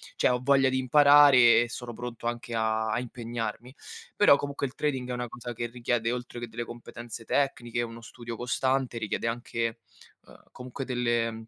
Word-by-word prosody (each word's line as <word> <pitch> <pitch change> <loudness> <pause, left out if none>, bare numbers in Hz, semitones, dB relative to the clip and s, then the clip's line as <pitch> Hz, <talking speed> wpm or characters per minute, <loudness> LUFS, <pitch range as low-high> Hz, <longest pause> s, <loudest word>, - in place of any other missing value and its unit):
cioè - - +2
ho 125 0 +1
voglia 135 -1 +4
di 130 - 0
imparare 140 -3 +7
e 120 - -6
sono 120 -1 -7
pronto 120 -1 -6
anche 120 0 -4
a 110 0 0
a 115 +3 0
impegnarmi. 120 0 -5 0.4
Però 205 -8 +6
comunque 140 -1 -3
il 125 - -13
trading 130 -4 -2
è - - -2
una 125 0 -3
cosa 120 +1 -7
che 120 +1 -4
richiede, 120 -1 -1
oltre 125 -1 -5
che 120 - -4
delle 115 +1 -5
competenze 120 -1 -9
tecniche, 120 -4 -1
uno 115 0 -6
studio 115 0 -8
costante, 130 0 -1
richiede 110 +1 -3
anche, 115 -1 -3 0.5
ehm, - - -17
comunque 130 +2 -7
delle 120 -3 -1
120 Hz, 180 wpm, -28 LUFS, 115-125 Hz, 0.5 s, imparare